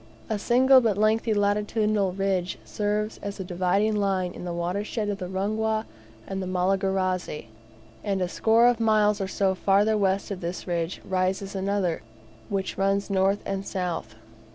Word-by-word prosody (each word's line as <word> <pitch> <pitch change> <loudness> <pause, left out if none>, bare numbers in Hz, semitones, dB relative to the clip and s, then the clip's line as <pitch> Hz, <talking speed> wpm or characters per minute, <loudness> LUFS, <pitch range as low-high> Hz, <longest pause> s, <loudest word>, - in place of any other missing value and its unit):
A 215 - 0
single 260 +4 +5
but 220 -5 +1
lengthy 220 +2 +2
latitudinal 210 -1 +1
ridge 190 -1 -1
serves 210 +1 -2
as 200 0 -6
a - - -2
dividing 185 +4 +1
line 190 -3 0
to - - -10
the 175 0 -4
watershed 200 +5 -2
of 205 -1 -3
the 180 - -4
Rungwa 215 +4 -1 0.4
and 195 0 -4
Malagarazi; 185 - -1 0.5
and 200 -2 -1
a 180 - 0
score 225 +5 +3
of 245 -1 +4
miles 215 -2 +3
or 195 - -1
so 190 0 +1
further 200 +3 +3
west 195 -1 0
of 190 - -5
this 175 +1 -4
ridge 170 0 -2
rises 190 +1 -1
another, 195 -3 -1 0.5
which 195 -2 -3
runs 195 +1 +1
north 195 +1 +2
and 195 0 -2
south. 180 - -4
195 Hz, 155 wpm, -26 LUFS, 185-210 Hz, 0.5 s, single